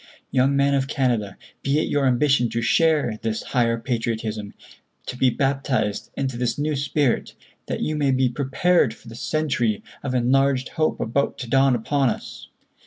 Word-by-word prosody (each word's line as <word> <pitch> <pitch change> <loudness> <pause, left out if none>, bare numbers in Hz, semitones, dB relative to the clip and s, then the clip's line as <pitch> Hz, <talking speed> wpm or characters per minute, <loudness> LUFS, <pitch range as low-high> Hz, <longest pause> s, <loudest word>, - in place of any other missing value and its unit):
Young 135 +1 +3
men 140 0 +3
of 135 -1 +1
Canada, 120 -9 -1 0.2
be 140 +2 +1
it 155 - +1
your 140 -2 +1
ambition 130 -1 +3
to 115 +1 -2
share 150 -8 +2
this 110 -1 -2
higher 115 -2 +1
patriotism, 110 -3 -3 0.5
to - - -5
be 130 0 +3
baptized 135 -6 -1
into 130 -3 -2
this 120 -1 -1
new 150 +1 -1
spirit, 140 -1 0 0.3
that - - -3
you 155 - -1
may 145 -2 +1
be 130 -1 +3
prepared 135 +1 +1
for 120 - -19
the 115 - -10
century 120 -7 -1 0.2
of 130 -2 -3
enlarged 130 +1 +2
hope 155 0 -1
about 130 +5 -1
to 125 - -6
dawn 135 +1 +4
upon 135 +3 +1
us. - - -6
130 Hz, 170 wpm, -23 LUFS, 115-140 Hz, 0.5 s, dawn